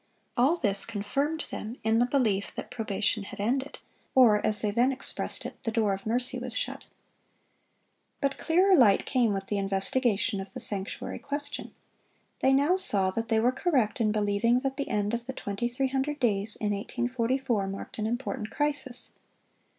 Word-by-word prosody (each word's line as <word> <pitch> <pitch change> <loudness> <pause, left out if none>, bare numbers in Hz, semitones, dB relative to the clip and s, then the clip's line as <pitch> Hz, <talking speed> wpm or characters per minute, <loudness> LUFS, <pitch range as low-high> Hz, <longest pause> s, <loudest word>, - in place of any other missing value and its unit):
All 265 +7 +4
this 200 - +4
confirmed 275 +9 -2
them 225 +4 -6
in 220 +1 +3
the 245 - +3
belief 225 -7 0
that - - -7
probation 220 -1 -1
had 200 +1 -9
ended, 260 +7 -1 0.4
or, 225 -5 +6
as 215 -1 +3
they 210 - +1
then 240 +5 +3
expressed 270 0 -3
it, - - -8
"the 225 - -2
door 220 -3 +1
of 195 +2 -6
mercy 245 +2 0
was 250 -1 -4
shut." - - -3 1.3
But 275 -1 -1
clearer 370 +4 +4
light 230 - +5
came 245 -5 +2
with 195 -1 -2
the 205 +1 -1
investigation 200 +2 0
of 190 - -10
the - - -6
sanctuary 200 -1 -3
question. 290 0 -3 0.6
They 265 - +3
now 285 +7 +3
saw 195 - +4
that 225 +3 -3
they 225 -1 +3
were 240 +3 +3
correct 255 - 0
in 215 -1 +2
believing 215 +3 +2
that 270 0 -2
the 280 0 -4
end 210 -1 0
of 235 0 -3
the 265 - -4
2300 265 +7 -2
days 210 -3 +1
in 210 -1 -2
1844 240 0 -1
marked 195 +3 -7
an 215 - 0
important 240 -1 -3
crisis. 285 -4 -1
235 Hz, 170 wpm, -28 LUFS, 205-265 Hz, 1.3 s, or